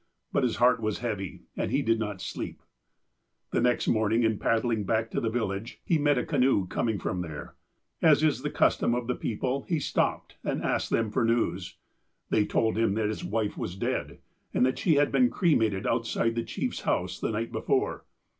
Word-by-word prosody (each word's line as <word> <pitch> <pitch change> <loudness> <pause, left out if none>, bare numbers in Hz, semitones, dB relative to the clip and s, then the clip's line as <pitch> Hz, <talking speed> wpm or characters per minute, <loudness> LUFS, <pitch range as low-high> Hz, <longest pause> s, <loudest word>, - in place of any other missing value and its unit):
But - - +3
his 125 -3 +1
heart 125 +1 +4
was 110 -1 -1
heavy, 105 -6 -4
and - - -1
he - - +1
did 115 0 +2
not 105 -4 -3
sleep. - - -6 0.4
" - - -51
The - - +1
next 125 0 +2
morning, 110 +1 +2
in 110 -2 +1
paddling 115 -1 +1
back 110 +2 0
to - - -1
the 115 - 0
village, 110 -1 -3
he 165 - +2
met 145 -1 +3
a 125 - 0
canoe 125 -7 +2
coming 110 +4 -1
from 90 -1 -2
there. 80 -4 -7 0.5
As 155 -2 +5
is 155 -4 +2
the - - -2
custom 120 - +2
of 120 -1 -2
the 125 - 0
people, 125 +4 -2
he 170 - +2
stopj)ed, 145 - -1
and - - -2
asked - - 0
them 115 -2 +1
for 120 - +1
news. 95 -6 0 0.5
They 105 -1 +3
told 110 -1 +1
him 115 -3 +2
that 110 -1 0
his 110 - -4
wife 105 +3 -2
was 90 - -4
dead, - - -2 0.4
and 125 - +4
that 130 - 0
she 160 - +3
had 145 0 +3
been 250 -1 +4
cre 175 -9 +2
mated 105 -4 +1
outside 115 0 0
the 115 - -1
chief's - - -3
house - - -1
the - - -1
night 115 +1 -2
before. - - -1
115 Hz, 205 wpm, -28 LUFS, 105-125 Hz, 0.5 s, As